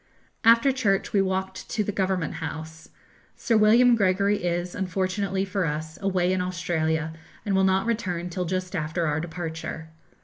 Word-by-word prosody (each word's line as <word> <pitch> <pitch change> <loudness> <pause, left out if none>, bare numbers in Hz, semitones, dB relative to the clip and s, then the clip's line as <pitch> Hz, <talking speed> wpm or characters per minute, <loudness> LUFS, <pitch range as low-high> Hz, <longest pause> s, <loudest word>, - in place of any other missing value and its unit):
After 230 +4 +6
church 210 -7 0
we 200 - +4
walked 190 0 -3
to 215 - 0
the 205 - -2
Government 190 -5 -1
House. 160 0 -7 0.5
Sir 230 - 0
William 235 +3 +6
Gregory 200 -1 +2
is, 175 0 -1
unfortunately 190 +1 -1
for 195 0 -1
us, 155 0 -4
away 185 -2 +1
in 185 - 0
Australia, 160 -3 -1 0.3
and 205 - 0
will 190 - +3
not 190 +1 +2
return 185 -7 -2
till 180 +1 -3
just 185 +2 -3
after 165 +1 -1
our 150 0 0
departure. 160 -1 -5
185 Hz, 160 wpm, -25 LUFS, 170-200 Hz, 0.5 s, After